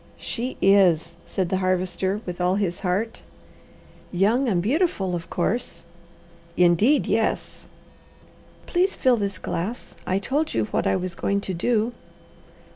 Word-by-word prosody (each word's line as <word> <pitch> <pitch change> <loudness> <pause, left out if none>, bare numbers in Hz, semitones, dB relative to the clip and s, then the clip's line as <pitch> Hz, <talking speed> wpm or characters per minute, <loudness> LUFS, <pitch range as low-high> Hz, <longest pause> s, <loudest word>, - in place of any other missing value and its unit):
"She 250 +2 -4
is!" 175 -4 +4
said 185 -3 -1
the 190 - +1
Harvester, 185 +2 0
with 180 0 -5
all 180 +1 +2
his 195 -4 -1
heart. 200 +5 -1 0.9
"Young 220 +8 +2
and 185 -5 +2
beautiful, 215 - 0
of 170 0 -6
course!" 215 +7 -2 0.7
"Indeed 180 - +4
yes!" - - -1 1.0
"Please 370 +2 +1
fill 255 -2 +3
this 200 -2 -2
glass. 195 +8 -4
I 185 - +1
told 285 +10 -1
you 110 - +2
what - - 0
I - - +2
was 185 -1 -2
going 200 +3 0
to 190 - -3
do." 225 +6 +1
195 Hz, 135 wpm, -24 LUFS, 180-230 Hz, 1.0 s, is